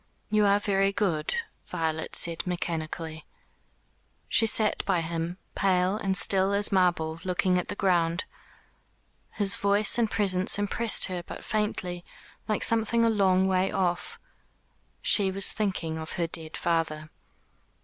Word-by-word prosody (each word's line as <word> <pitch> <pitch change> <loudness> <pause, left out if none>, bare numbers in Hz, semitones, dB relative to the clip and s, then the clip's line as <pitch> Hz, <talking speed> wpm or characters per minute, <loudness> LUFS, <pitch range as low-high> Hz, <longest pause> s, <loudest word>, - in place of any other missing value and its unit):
"You 210 -1 +3
are 200 0 +4
very 195 -1 +1
good," 180 - -1 0.3
Violet 160 -1 -2
said 170 +1 0
mechanically. 160 -2 -4 1.0
She 225 - +2
sat 215 -1 +2
by 185 -4 +1
him, 165 +1 -4 0.2
pale 185 0 +1
and 195 -3 -1
still 195 0 +3
as 205 +1 +3
marble, 175 -4 +1
looking 180 0 +1
at 180 - -5
the - - -4
ground. 175 -2 +1 1.1
His 200 -2 +2
voice 205 +3 +3
and 225 -2 +1
presence 190 -3 +2
impressed 205 +2 +2
her 180 -2 -4
but - - -10
faintly, 185 -5 -3 0.4
like 215 - -1
something 230 +1 +2
a 230 - +3
long 190 -3 +2
way 185 0 +1
off. 175 -2 -2 0.9
She 200 -2 +4
was 195 +1 +1
thinking 180 -7 -3
of 160 0 -6
her 170 - -1
dead 160 -1 -1
father. 160 -2 -2
185 Hz, 140 wpm, -27 LUFS, 170-200 Hz, 1.1 s, are